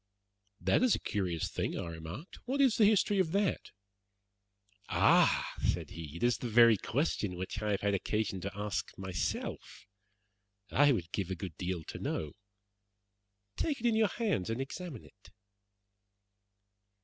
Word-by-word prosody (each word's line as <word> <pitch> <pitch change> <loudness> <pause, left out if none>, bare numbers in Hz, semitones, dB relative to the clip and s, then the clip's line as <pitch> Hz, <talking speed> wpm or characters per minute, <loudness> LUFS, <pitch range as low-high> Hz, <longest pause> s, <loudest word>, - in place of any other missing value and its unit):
"That - - +2
is 255 -3 +4
a - - -4
curious 90 -6 -2
thing," - - -2
I - - -3
remarked. 85 - -8
"What 265 +3 -1
is 265 -5 +4
the 215 - +6
history 205 -1 +3
of 165 -4 +1
that?" 200 -1 0 1.2
"Ah!" - - +4
said - - 0
he, 80 -2 -8
"it 85 - -5
is 120 0 +3
the 120 - -3
very 115 0 +7
question 110 - -1
which 95 +4 -5
I 105 - -1
have 100 - -1
had 100 0 +1
occasion 100 0 -1
to 100 +1 -5
ask 100 -4 -3
myself. 95 0 -4 0.9
I 145 +1 +5
would 90 -9 -2
give 95 -3 -2
a 95 - -2
good 90 -3 -7
deal 90 -2 -3
to - - -8
know. 75 -2 -3 1.2
Take 295 -3 -1
it 235 - -5
in 230 -2 +3
your 220 -1 +4
hands 200 - -1
and 115 +2 -2
examine 135 0 -6
it." - - -19
105 Hz, 160 wpm, -32 LUFS, -, 1.2 s, very